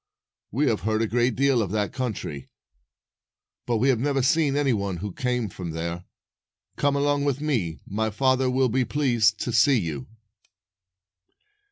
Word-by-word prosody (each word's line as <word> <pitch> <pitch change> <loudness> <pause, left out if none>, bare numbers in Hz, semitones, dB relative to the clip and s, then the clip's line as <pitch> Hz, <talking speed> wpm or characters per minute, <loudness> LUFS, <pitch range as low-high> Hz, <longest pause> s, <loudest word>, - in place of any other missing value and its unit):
"We 140 +7 0
have 110 -4 +1
heard 110 +1 0
a - - 0
great 120 +1 +1
deal 135 -3 +3
of 100 - -2
that 105 -1 -1
country, 110 - -4 1.2
but 120 -1 +1
we 130 +5 +2
have 125 -4 +2
never 135 0 0
seen 150 0 +2
any 140 -3 +2
one 100 -4 -2
who 100 +2 -5
came 125 -1 -1
from 90 -3 -7
there. 85 +2 -4 0.7
Come 140 0 +1
along 145 0 +1
with 140 -2 0
me. 105 - -2
My 110 +3 -1
father 130 +3 +2
will 130 0 +2
be 130 +3 +1
pleased 120 -7 +2
to 120 - -2
see 135 +2 +4
you." 80 -8 -4
120 Hz, 165 wpm, -25 LUFS, 105-135 Hz, 1.2 s, see